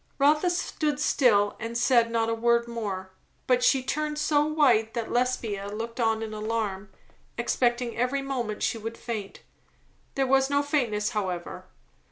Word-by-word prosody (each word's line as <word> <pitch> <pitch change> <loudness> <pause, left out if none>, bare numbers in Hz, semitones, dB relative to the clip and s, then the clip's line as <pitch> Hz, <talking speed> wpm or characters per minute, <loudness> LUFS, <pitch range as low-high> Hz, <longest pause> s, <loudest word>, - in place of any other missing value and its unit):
Rotha 300 +5 +3
stood 305 -4 -1
still 210 -9 +3
and 230 +1 -4
said 235 -1 +3
not 230 -1 0
a 230 - 0
word 235 +1 +2
more. 200 -5 -5 0.3
But 250 -1 +2
she 260 +1 +3
turned 300 +2 -2
so 295 -1 +2
white 260 -8 +2
that 230 -2 -3
Lesbia 235 -5 -1
looked 230 +4 -6
on 225 -1 +1
in 220 -1 -6
alarm, 210 -2 -3 0.5
expecting 240 0 0
every 255 +3 0
moment 240 -6 -3
she 230 - 0
would 225 +1 -6
faint. 215 -5 -6 0.7
There 270 - +1
was 270 +1 +3
no 285 0 +2
faintness, 235 -8 0
however. 185 -6 -4
235 Hz, 155 wpm, -27 LUFS, 220-270 Hz, 0.7 s, Rotha